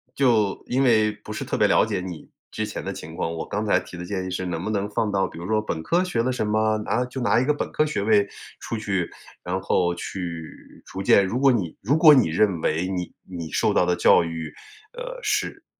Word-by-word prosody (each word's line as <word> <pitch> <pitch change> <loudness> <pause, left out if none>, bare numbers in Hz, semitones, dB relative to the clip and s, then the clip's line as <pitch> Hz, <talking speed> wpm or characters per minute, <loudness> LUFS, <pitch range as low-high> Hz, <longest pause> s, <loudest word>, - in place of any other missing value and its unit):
就 115 -7 +2
因 130 +2 +1
为 110 -5 +4
不 105 - -10
是 - - -4
特 - - -3
别 - - +4
了 - - +4
解 - - -2
你 90 -3 -8 0.2
之 - - -3
前 - - -5
的 - - -4
情 80 +1 -9
况， 85 -2 -2
我 80 - -4
刚 105 +1 -3
才 105 - +3
提 90 - -11
的 90 - -6
建 95 0 -3
议 95 - -5
是 95 0 -3
能 85 -2 -3
不 - - -3
能 105 -1 -1
放 105 0 -1
到 95 -1 +1
比 - - -12
如 85 - -7
说 110 +2 +1
本 80 -6 -4
科 170 - +2
学 120 -11 0
的 130 - 0
什 125 -4 -2
么， 110 0 +2
拿 125 - +1
就 125 +1 -7
拿 120 - +2
一 120 - +3
个 150 - +3
本 145 - -3
科 155 - +2
学 150 -9 -2
位 105 -1 +4 0.4
出 115 - -4
去， 100 -5 -1 0.3
然 90 +2 -2
后 90 -1 +1
去 85 -2 -5 0.4
逐 95 - -6
渐 100 0 +5
如 115 - -2
果 135 +1 +5
你 95 -10 -1
如 135 +9 +2
果 160 -1 +8
你 130 - +4
认 90 0 +1
为 80 +4 0
你 90 -2 -3 0.2
你 85 -3 -6
受 - - +1
到 - - +3
的 90 - +2
教 85 - +5
育， 80 -2 -5 0.4
呃， - - -6
是 - - -2
100 Hz, 265 characters per minute, -24 LUFS, 90-115 Hz, 0.4 s, 果